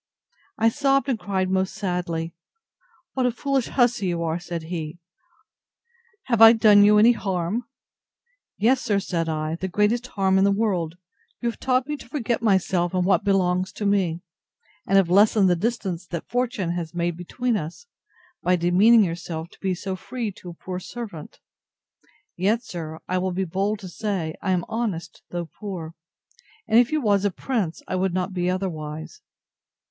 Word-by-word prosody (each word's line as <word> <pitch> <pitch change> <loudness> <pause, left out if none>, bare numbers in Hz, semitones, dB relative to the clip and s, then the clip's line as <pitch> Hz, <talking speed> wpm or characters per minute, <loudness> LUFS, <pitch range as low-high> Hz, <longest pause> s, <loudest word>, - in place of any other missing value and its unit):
I 225 +1 +4
sobbed 275 +2 +1
and 240 -4 0
cried 190 -3 -1
most 190 0 0
sadly. 175 -4 -2 0.8
What 260 -2 +1
a - - +1
foolish 270 +1 -1
hussy 240 -6 +2
you 170 -1 -1
are! 165 +1 -1
said 170 -2 -5
he: 160 -1 -5 1.3
Have 235 -3 0
I 225 0 +11
done 215 -3 +6
you 210 +1 +6
any 220 +3 +7
harm? 195 +1 -2 0.9
Yes, 250 +5 +3
sir, 205 -2 +1
said 170 -4 -2
I, 155 +1 -2
the 190 - -3
greatest 210 +6 +1
harm 190 -4 +2
in - - +4
the 200 - +4
world: 185 -6 0 0.4
You 235 - 0
have - - -17
taught 255 0 +1
me 295 +1 -3
to - - -13
forget 240 -6 -1
myself 190 -4 +1
and 180 -1 +1
what 185 -3 +3
belongs 185 -1 +1
to 210 - -4
me, 185 -5 +1 0.7
and 195 - +4
have 185 -3 +3
lessened 205 +1 +5
the 180 - +4
distance 190 -3 -2
that 170 -2 -5
fortune 240 -7 -1
has 170 -1 -4
made 170 -1 -1
between 235 +8 -2
us, 170 - -5 0.6
by 180 +1 +3
demeaning 190 +7 +5
yourself, 165 -2 -4
to - - -20
be 190 -2 -1
so 190 +2 -4
free 230 +2 -4
to 180 -1 -11
a - - -8
poor 180 +1 -6
servant. 200 -6 -8 1.0
Yet, 215 +6 +1
sir, 160 -6 -6
I 185 0 0
will 185 0 -1
be 190 +2 -1
bold 195 +5 -1
to 190 - -7
say, 180 -3 -3
I 195 - -2
am 180 -2 +1
honest, 215 -7 -3
though 175 -1 -3
poor: 170 -3 -7 0.7
and 225 - +5
if 245 +2 +3
you 310 -1 +1
was 205 -4 +2
a 205 - +3
prince, 195 -3 -3
I - - -2
would 185 -1 0
not 185 +1 -1
be 180 -1 0
otherwise. 160 -5 -4
190 Hz, 175 wpm, -24 LUFS, 175-220 Hz, 1.3 s, I